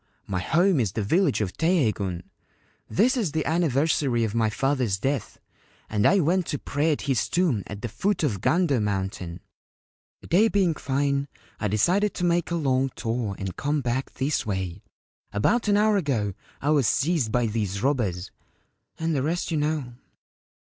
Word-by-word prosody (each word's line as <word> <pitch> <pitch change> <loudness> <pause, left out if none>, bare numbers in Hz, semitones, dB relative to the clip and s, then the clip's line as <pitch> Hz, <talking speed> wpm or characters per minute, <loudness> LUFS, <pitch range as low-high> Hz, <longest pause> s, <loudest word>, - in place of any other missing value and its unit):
My 95 -2 -2
home 170 - +2
is 105 -6 0
the 110 - -1
village 160 - +2
of 100 -3 -2
Teiheigun. 110 - 0 0.7
This 245 +7 +3
is 205 - -1
the 155 -2 -1
anniversary 145 -5 +1
of 110 -2 -2
my 115 -1 +2
father's 125 -3 0
death, 135 +4 -2 0.5
and 105 -1 +3
I 200 - +4
went 175 +2 +1
to 145 - -2
pray 145 +4 0
at 150 - -1
his 135 -4 0
tomb 165 - +1
at 105 -1 -8
the - - -1
foot 185 - -1
of 105 -11 0
Gando 165 -8 +2
Mountain. 95 -4 -3 0.8
The - - -14
day 200 +6 +4
being 195 -6 +2
fine, 140 0 -1 0.3
I 105 - 0
decided 180 - +2
to 180 - -3
make 170 -1 +1
a 170 - -1
long 135 -4 +1
tour 115 -3 -2
and 95 -2 -5
come 145 +1 -1
back 125 +1 -2
this 140 +2 0
way. 95 -5 -3 0.5
About 215 - +1
an 205 -1 +4
hour 210 0 +3
ago 120 - -1 0.3
I 145 - +2
was 140 -6 +3
seized 145 -6 +1
by 120 0 +2
these 105 -2 -2
robbers; 105 -10 0 0.7
and 165 -1 -1
the 135 - +1
rest 170 +5 -1
you 160 - +1
know. 150 -4 -1
135 Hz, 175 wpm, -25 LUFS, 110-165 Hz, 0.8 s, I